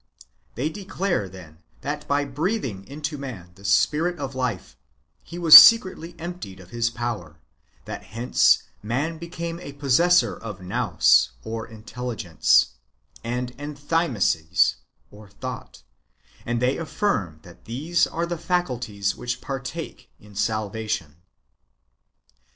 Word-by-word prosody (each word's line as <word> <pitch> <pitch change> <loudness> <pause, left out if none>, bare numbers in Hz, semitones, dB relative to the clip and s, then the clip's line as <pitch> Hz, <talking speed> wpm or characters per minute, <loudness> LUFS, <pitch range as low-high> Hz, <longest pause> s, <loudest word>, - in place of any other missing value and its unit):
They 130 +6 -1
declare, 190 - -2
then, 85 -4 -13 0.2
that 145 +1 -4
by 145 0 +1
breathing 140 - -3
into 150 +1 -5
man 110 -11 -8
the 95 - -18
spirit 155 - +2
of 135 - -5
life, 125 -7 -3 0.5
he 170 - -10
was 165 -3 +9
secretly 180 +1 +8
emptied 170 - -7
of 95 0 -15
his 120 0 0
power; 120 -9 -5 0.5
that - - -7
hence 115 +4 +3 0.2
man 140 +10 -2
became 170 0 -6
a 145 -5 -9
possessor 145 +6 +3
of 105 -4 -8
nous 90 - +3
(intelligence) 110 - 0 0.5
and 125 +1 -3
enthymesis 145 - +1 0.6
(thought); 125 - -7 0.6
and 120 0 0
they 125 +2 +1
affirm 155 - -1
that 85 -1 -16
these 155 +9 0
are 170 +1 -2
the 170 -1 -4
faculties 125 - -1
which 120 - -4
partake 135 +5 -6
in 105 0 -17
salvation. 105 -6 -2
125 Hz, 115 wpm, -24 LUFS, 105-160 Hz, 0.6 s, was